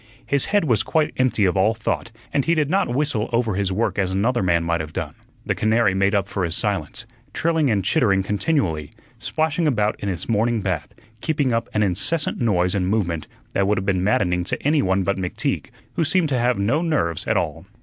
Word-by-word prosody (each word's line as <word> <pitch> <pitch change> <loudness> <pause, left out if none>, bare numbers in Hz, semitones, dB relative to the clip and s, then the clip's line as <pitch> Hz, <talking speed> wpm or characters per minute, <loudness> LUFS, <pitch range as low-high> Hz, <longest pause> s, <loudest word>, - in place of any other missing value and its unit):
His 140 -2 +2
head 205 -2 +2
was 115 -7 +3
quite 150 +7 0
empty 130 -5 +2
of 90 - +1
all 105 +4 +3
thought, 115 +1 -3 0.2
and 140 - +2
he 170 - +2
did 150 -2 0
not 195 - +2
whistle 130 -5 0
over 115 -2 +1
his 95 0 -1
work 105 +2 -1
as 95 -2 +1
another 110 +6 +1
man 85 -3 +2
might 85 0 0
have 80 -1 -8
done. - - -4 0.3
The - - +1
canary 110 -2 +2
made 95 +2 +2
up 100 -1 +1
for 100 - -3
his 85 -1 +1
silence, 105 +1 -2 0.3
trilling 160 -4 +1
and 100 -4 +1
chittering 100 -11 +3
continually, 95 - -1 0.3
splashing 160 +1 0
about 105 -6 +1
in 100 - -3
its 90 - -4
morning 115 +1 +1
bath, 90 -6 -3 0.3
keeping 145 -6 0
up 115 0 -1
an 105 - +1
incessant 105 - -1
noise 90 -6 +2
and 95 -3 0
movement 90 -7 -1 0.3
that 100 0 +1
would 105 - +2
have 95 - -2
been 95 -2 +1
maddening 90 -3 +1
to - - -3
any 150 +1 +3
one 95 +1 +1
but 100 +1 0
McTeague, 90 -1 -2 0.3
who 165 - 0
seemed 165 0 +2
to 130 -3 +1
have 120 -1 +2
no 115 +11 +1
nerves 140 - -1
at - - +2
all. 80 +3 -3
105 Hz, 215 wpm, -22 LUFS, 95-130 Hz, 0.3 s, was